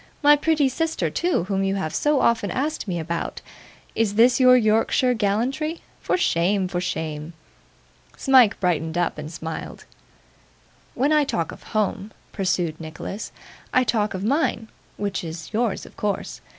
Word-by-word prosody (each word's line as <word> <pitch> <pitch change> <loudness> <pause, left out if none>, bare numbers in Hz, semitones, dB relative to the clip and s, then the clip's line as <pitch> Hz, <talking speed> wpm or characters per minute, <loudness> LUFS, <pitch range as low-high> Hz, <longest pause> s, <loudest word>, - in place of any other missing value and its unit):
my 295 +1 +8
pretty 300 -1 +2
sister 320 +5 -1
too, 350 - 0
whom 195 +1 -1
you 195 0 0
have 160 -6 -3
so 295 -2 +2
often 225 -3 +2
asked 285 - -2
me 180 -2 -2
about. 170 +1 -4 0.5
Is 215 -3 0
this 240 +4 +5
your 255 -1 +7
Yorkshire 225 +3 +2
gallantry? 245 +10 -1 0.2
For - - 0
shame! 190 - +1
for 180 -1 -3
shame!' 160 -2 -4 0.8
Smike 260 -6 +5
brightened 165 -2 0
up 175 -3 0
and 150 +1 -7
smiled. 160 -1 -7 1.1
'When 280 +5 +2
I 300 -1 +4
talk 170 - -2
of - - -12 0.2
home,' 205 0 -1 0.2
pursued 180 -4 -1
Nicholas, 165 +6 -6 0.4
'I 255 - +5
talk 215 -4 0
of 185 - -4
mine 230 -2 0 0.3
which 200 -3 -2
is 165 +3 -7
yours 225 -1 -1
of - - -15
course. 205 -1 -3
205 Hz, 150 wpm, -23 LUFS, 175-255 Hz, 1.1 s, my